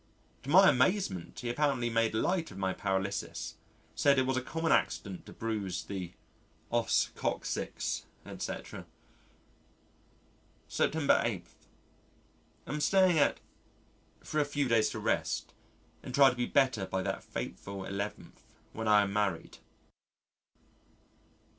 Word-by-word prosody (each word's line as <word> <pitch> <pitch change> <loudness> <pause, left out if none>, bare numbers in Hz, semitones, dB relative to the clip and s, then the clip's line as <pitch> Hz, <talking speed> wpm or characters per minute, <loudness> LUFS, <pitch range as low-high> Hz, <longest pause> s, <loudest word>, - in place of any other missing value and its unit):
To 130 - -9
my 190 +5 +8
amazement, 130 - +1
he 120 - -3
apparently 135 -2 +1
made 115 -1 +1
light 170 +8 0
of - - -11
my 95 -1 0
paralysis, 95 -5 -2 0.4
said 140 -1 +3
it 130 - +3
was 130 0 0
a 130 - 0
common 160 +4 -2
accident 95 -4 0
to - - -9
bruise 105 -5 -3
the 90 -3 -6 0.6
os - - +2
coccyx, - - -2 0.2
etc. - - -6 1.8
September 155 -2 +2
8. 100 -7 -2 1.2
Am 150 +1 -3
staying 185 -1 +4
at 145 - +2 0.8
for 155 - -2
a - - +4
few 145 -1 -1
days 115 -2 +3
to - - -5
rest - - -1 0.5
and 125 - -5
try 140 -2 +7
to - - -7
be 120 -1 -1
better 130 -8 +2
by 95 0 -2
that - - -3
fateful 100 0 -6
11th, 100 +2 -5 0.3
when 110 0 -4
I 105 -1 +6
am 100 -1 -3
married. 100 -5 -1
115 Hz, 130 wpm, -31 LUFS, 100-145 Hz, 1.8 s, my